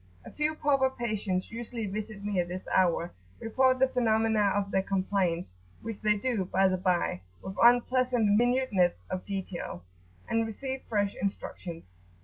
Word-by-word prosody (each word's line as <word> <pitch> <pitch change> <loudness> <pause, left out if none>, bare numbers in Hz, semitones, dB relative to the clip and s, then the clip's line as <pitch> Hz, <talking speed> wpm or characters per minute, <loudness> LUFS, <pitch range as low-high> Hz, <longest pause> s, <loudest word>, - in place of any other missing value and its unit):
A - - -9
few 305 +1 0
pauper 275 -3 +2
patients 215 -7 -2
usually 230 -1 -4
visit 210 0 -5
me 205 -3 0
at 175 - 0
this 180 +2 -5
hour, 175 -2 +2 0.3
report 255 +3 +2
the 265 +1 +4
phenomena 220 -4 +2
of 200 -1 -1
their 190 - +2
complaints, 190 - -1 0.3
which 225 -2 -6
they 210 -1 +3
do, 230 -2 0
by 190 +1 +2
the 185 0 +1
bye, 180 - 0 0.2
with 190 0 -6
unpleasant 245 -2 +4
minuteness 230 - +2
of 185 - -4
detail, 190 - -5 0.4
and 225 0 +1
receive 265 +4 -5
fresh 205 -3 +1
instructions. 170 - -5
210 Hz, 150 wpm, -29 LUFS, 185-240 Hz, 0.4 s, the